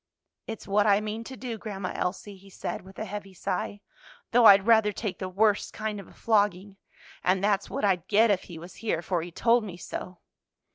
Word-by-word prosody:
"It's 225 -1 -7
what 205 +1 +3
I 200 -1 +5
mean 215 +1 -4
to 260 +1 -8
do, 235 -4 -5
Grandma 195 -4 -5
Elsie," 195 +2 -3
he 195 +1 -17
said - - -5
with 190 +1 -15
a 215 - -4
heavy 200 -2 -7
sigh, 200 +2 -3 0.5
"though 240 0 +5
I'd 195 -2 +8
rather 220 -2 +5
take 205 -2 -4
the 185 - -4
worst 205 +2 +1
kind 215 -1 -3
of 195 - -10
a - - -17
flogging. 205 -3 +1 0.5
And 185 +1 +2
that's 200 -1 +1
what - - -1
I'd 185 -4 +1
get 220 +1 +4
if 190 - 0
he 175 - -9
was 170 +3 -11
here, 210 -7 -2
for 175 -2 -1
he 170 - -6
told 230 +6 +3
me 185 -5 -7
so." 180 0 -7
200 Hz, 210 wpm, -27 LUFS, 185-215 Hz, 0.5 s, I'd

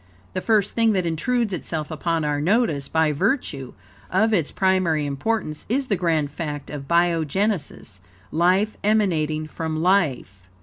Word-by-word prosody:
The 185 - -2
first 210 -2 +2
thing 230 -1 +3
that 185 -3 0
intrudes 210 +7 0
itself 160 -3 -4
upon 160 0 -1
our 145 -1 0
notice, 165 - +1
by 160 -1 +2
virtue 150 - -1 0.3
of 220 +4 +2
its 165 -8 +1
primary 185 -5 +1
importance, 150 +2 -2
is 265 +3 0
the 205 - +3
grand 160 -5 0
fact 145 -2 -5
of 140 -2 -7
biogenesis 170 - 0 0.3
life 185 +6 +2
emanating 165 -8 +1
from 155 +1 -4
life. 155 - +1
170 Hz, 140 wpm, -23 LUFS, 150-200 Hz, 0.3 s, thing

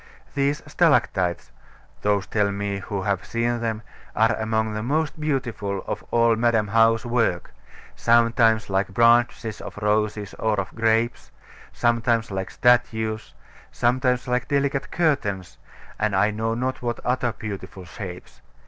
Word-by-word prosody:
These 140 +3 0
stalactites 120 - +1 0.5
(those 100 -2 +1
tell 105 -2 0
me 100 0 -3
who 100 -1 -4
have 100 -2 -1
seen 120 +1 -1
them) 115 -1 -3 0.3
are - - +3
among 110 0 -1
the 110 - -3
most 150 +6 -1
beautiful 120 -10 -2
of - - -4
all 115 -1 +3
Madam 115 -2 +1
How's 115 +1 +3
work; 115 -7 0 0.4
sometimes 115 -1 +3
like 95 0 0
branches 115 0 +2
of - - -9
roses 105 0 0
or 110 -2 +1
of 95 - -4
grapes; 115 +1 0 0.4
sometimes 115 -2 +1
like 95 -1 -3
statues; 110 -3 +1 0.4
sometimes 125 +1 +1
like 125 0 0
delicate 140 0 0
curtains, 100 - -1 0.4
and 110 -2 0
I 105 +3 +3
know 110 +1 -2
not 130 +2 -2
what 120 -1 -2
other 125 0 0
beautiful 95 -3 -7
shapes. 90 0 -9
115 Hz, 135 wpm, -24 LUFS, 100-120 Hz, 0.5 s, are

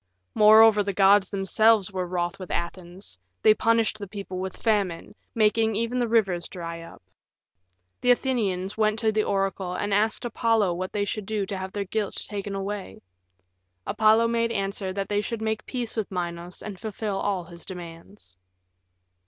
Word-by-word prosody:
Moreover, 215 0 +7
the 200 -1 -2
gods 195 -1 +5
themselves 205 +1 +3
were 185 -2 -3
wroth 175 0 -2
with 185 - -8
Athens; 175 - -5 0.2
they 215 - +7
punished 225 -1 +1
the 200 - -6
people 195 -2 -6
with 190 0 -5
famine, 200 -7 -1 0.2
making 220 0 +2
even 230 +3 -1
the 240 - +1
rivers 195 -7 +1
dry 170 -2 -7
up. 165 - -13 1.0
The 250 - +1
Athenians 210 -7 +1
went 215 0 +1
to 220 -1 +2
the 215 0 +1
oracle 195 -2 -1
and 205 +2 -2
asked 220 +4 +1
Apollo 225 -5 +1
what 185 +2 -4
they 205 -1 -1
should 205 0 -4
do 215 -2 -1
to 195 - -5
have 190 0 -5
their 200 0 -3
guilt 205 +1 -2
taken 200 -1 -5
away. 195 - -5 0.8
Apollo 220 +1 +4
made 230 0 +1
answer 195 -2 -2
that 195 0 -3
they 205 0 0
should 230 +1 -4
make 220 0 -3
peace 245 -3 -4
with 220 -3 -2
Minos 175 -1 -5
and 200 -3 -7
fulfill 210 -1 -3
all 195 -3 -1
his 170 0 -12
demands. 170 - -10
200 Hz, 170 wpm, -25 LUFS, 185-220 Hz, 1.0 s, Moreover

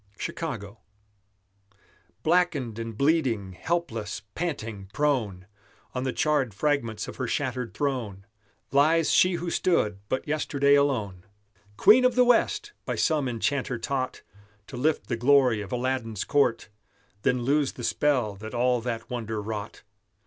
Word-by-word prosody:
CHICAGO 115 - -5 1.4
Blackened 155 -10 +1
and 115 -2 -6
bleeding, 130 - +1
helpless, 110 - -3
panting, 115 - -4
prone, 110 -9 0 0.5
On 125 0 -2
the 130 - 0
charred 140 -9 0
fragments 115 -5 -1
of - - -8
her 130 - -2
shattered 125 -3 -2
throne 120 -9 -2 0.5
Lies 155 +3 +4
she 185 0 +5
who 170 0 -3
stood 105 - +1
but 130 - -2
yesterday 140 -2 +2
alone. 115 -11 +1 0.5
Queen 240 +5 +7
of 250 -1 +3
the 250 0 +5
West! 330 - +2
by - - -3
some 150 -5 +1
enchanter 125 +2 -1
taught 130 +2 -3 0.4
To - - -10
lift 150 +5 0
the 120 - -2
glory 125 -3 +4
of 105 - -8
Aladdin's 125 -4 -2
court, 125 -7 +1 0.5
Then 125 +2 +1
lose 140 +2 +1
the 120 - -9
spell 125 -6 +1
that 110 +4 -8
all 125 0 +2
that 115 -1 -4
wonder 110 -3 -4
wrought. 105 0 -6
130 Hz, 135 wpm, -26 LUFS, 110-150 Hz, 1.4 s, Queen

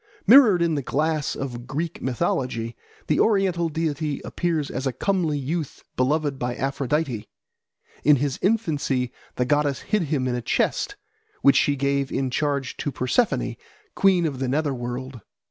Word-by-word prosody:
Mirrored 215 -6 +7
in 170 -1 +1
the 145 - 0
glass 155 +2 -1
of 120 -3 -5
Greek 160 +5 -3
mythology, 120 -2 -1 0.3
the 150 - +1
oriental 190 -6 +2
deity 150 -2 -2
appears 165 -5 -1
as 130 +2 -2
a - - +1
comely 170 -1 0
youth 150 +2 -4
beloved 145 +1 0
by 120 0 -2
Aphrodite. 135 -3 -1 0.8
In 150 - +6
his 140 -1 -1
infancy 145 - 0 0.2
the 125 - 0
goddess 145 0 +1
hid 215 -1 0
him 135 -4 0
in 125 - 0
a 120 - -2
chest, 410 - 0 0.5
which 140 - +6
she 145 - +3
gave 140 0 0
in 135 -2 -1
charge 140 -1 -1
to 145 - -2
Persephone, 135 - 0 0.4
queen 185 -3 +3
of 140 -5 -2
the 130 - -1
nether 145 +2 0
world. 125 0 -5
145 Hz, 155 wpm, -24 LUFS, 130-160 Hz, 0.8 s, Mirrored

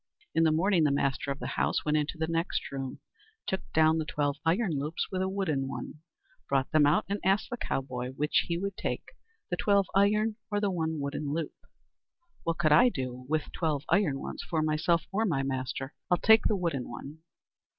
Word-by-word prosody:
In 165 - +3
the 160 - +4
morning 175 +2 +3
the 150 - +4
master 140 -1 0
of 135 - -1
the - - -7 0.2
house - - 0
went 150 0 +2
into 150 +2 0
the 160 - 0
next 165 +2 -1
room, 135 -1 -4 0.5
took 190 - -1
down 160 0 +4
the 155 - -2
twelve 145 -1 -1
iron 165 -2 +1
loops 150 +4 -2
with 185 -1 -1
a 190 - 0
wooden 160 -9 -1
one, 140 +2 -6 0.5
brought 135 -1 +1
them 155 -3 +5
out, 150 - +3
and 200 +2 -2
asked 195 +6 +2
the 240 - -2
cowboy 130 - -3
which 150 +6 +1
would 190 +4 -1
he - - -9
take, - - -3 0.4
the 175 - 0
twelve 200 0 +3
iron 210 +2 +3
or 205 -1 0
the 205 -1 +1
one 160 -3 -1
wooden 140 +1 -3
loop. 160 0 -2 0.9
"What 165 -1 -1
could 155 -3 +2
I 165 +12 +7
do 130 - -5
with 155 0 +1
the - - -15
twelve 155 -4 -1
iron 175 -10 +3
ones - - -6
for 160 -3 -1
myself 155 +2 +2
or 210 +3 +1
my 155 -11 +1
master? 135 +1 -3 0.2
I'll 180 - +4
take 220 +3 +5
the 210 - +1
wooden 165 -8 -2
one." 140 +6 -8
160 Hz, 205 wpm, -29 LUFS, 140-190 Hz, 0.9 s, I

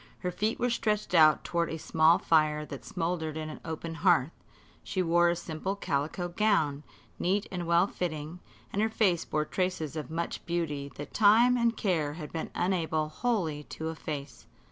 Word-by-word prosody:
Her 180 - -1
feet 215 +5 -1
were 245 0 +1
stretched 210 -4 -1
out 155 -3 +6
toward 170 -1 -1
a 160 - -4
small 160 +2 +4
fire 155 -4 +2
that 140 -2 -8
smouldered 165 -2 -3
in 155 0 -4
an - - -9
open 165 0 -5
hearth. 165 -4 +3 0.5
She 185 - -1
wore 175 0 +4
a 170 - +1
simple 170 +4 -4
calico 160 0 -2
gown, 175 -7 +1 0.4
neat 195 +3 +1
and 175 -2 -4
well 170 +2 +4
fitting, 165 -3 -4 0.3
and 205 - +1
her 220 - +2
face 195 -7 +1
bore 155 0 -1
traces 180 -4 -2
of 150 -5 -5
much 165 +1 -3
beauty 150 -5 -2
that 145 0 -8
time 230 +4 +6
and 235 -2 +1
care 160 -7 0
had 150 -2 -8
been 160 - -3
unable 160 -4 0
wholly 170 -7 -1
to 160 0 -5
efface. 150 -3 -6
170 Hz, 175 wpm, -29 LUFS, 155-185 Hz, 0.5 s, out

